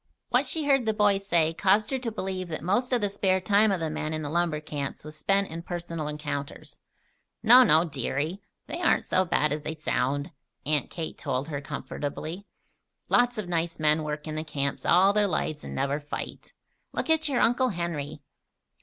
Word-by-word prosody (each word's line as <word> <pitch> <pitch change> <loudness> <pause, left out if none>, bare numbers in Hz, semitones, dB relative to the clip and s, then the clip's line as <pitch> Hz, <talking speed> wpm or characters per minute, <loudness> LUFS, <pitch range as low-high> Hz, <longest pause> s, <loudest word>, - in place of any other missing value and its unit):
What - - +2
she 315 -2 0
heard 270 -5 +3
the 220 - +1
boys 200 -2 +2
say 165 -3 +2
caused 200 +6 +2
her 265 - 0
to 240 -3 -3
believe 190 -3 -4
that 155 -2 -5
most 220 +9 +1
of 245 -2 +2
the 205 - +2
spare 195 -1 +1
time 205 +3 +3
of 190 - 0
the 160 -1 -2
men 155 0 -3
in 155 - -4
the 145 - -4
lumber 170 -2 +1
camps 145 -2 -5
was 155 +1 -9
spent 195 +6 +1
in 165 +1 -6
personal 170 -3 -5
encounters. 145 -2 -5 0.6
"No, 240 +3 +9
no, 160 -9 +6
deary. 150 - -3 0.2
They - - -5
aren't - - +3
so 185 - +2
bad 150 -3 +1
as 150 - -3
they 155 +2 -4
sound," 145 0 -1 0.3
Aunt 150 0 0
Kate 165 -2 -6
told 130 +4 -2
her, 140 -2 -3
comfortably. 155 +6 -5 0.6
"Lots 245 -1 +3
of 210 -4 -3
nice 165 -1 -1
men 155 0 +3
work 150 0 -4
in 155 - -4
the 155 0 -3
camps 140 -3 -3
all 190 +3 +5
their 210 -1 +3
lives 155 -3 -2
and - - -7
never 140 +2 0
fight. 145 0 -7 0.4
Look - - -2
at 320 -1 +3
your 265 - +1
Uncle 250 +2 +3
Henry." 155 -6 -4
170 Hz, 200 wpm, -27 LUFS, 150-200 Hz, 0.6 s, No